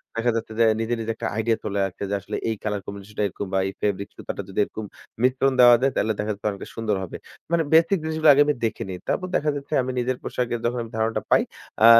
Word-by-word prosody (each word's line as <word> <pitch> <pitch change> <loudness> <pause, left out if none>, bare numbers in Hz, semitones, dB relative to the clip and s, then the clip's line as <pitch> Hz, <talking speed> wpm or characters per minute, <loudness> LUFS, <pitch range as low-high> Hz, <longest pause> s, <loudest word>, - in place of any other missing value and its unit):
দেখা 115 +1 +2
যাচ্ছে 110 -1 -3
যে, - - +6 0.2
নিজে, 115 +1 -1
নিজে 115 0 -2
একটা - - -3
আইডিয়া 110 0 +1
চলে 100 -1 -1
আসছে 95 +1 -8
যে 100 - 0
আসলে, 95 - -5
এই 110 - 0
কলার 105 -2 -1
কম্বিনেশন 100 +1 -9
টা - - +3
এরকম 100 +1 -6
বা 95 - +3
এই 95 - -4
ফেব্রিক্স 100 -1 -1
সুতাটা - - -5
যদি 95 - -3
এরকম 110 +1 -6 0.4
মিশ্রণ 130 +1 +3
দেওয়া 120 -1 +9
যায়, 135 +1 +3
তাইলে 110 +1 +1
দেখা 105 +1 -1
যাবে 100 - -13
অনেকটা 100 - -8
সুন্দর 110 -2 0
হবে। 90 - -6 0.3
মানে 170 -1 +3
বেসিক 165 +5 +5
জিনিসগুলা 160 0 +3
আগে 140 - +5
আমি 150 - +2
দেখে 110 - -2
নিই। 90 - -4
তারপর 185 - 0
দেখা 150 - +2
যাচ্ছে 140 +2 -6
আমি 130 +1 -2
নিজের 125 +1 0
পোশাকের 120 -1 -2
যখন 120 0 0
ধারণাটা 110 -1 0
পাই, - - +6 0.4
আ - - +10
115 Hz, 240 wpm, -24 LUFS, 105-130 Hz, 0.4 s, আ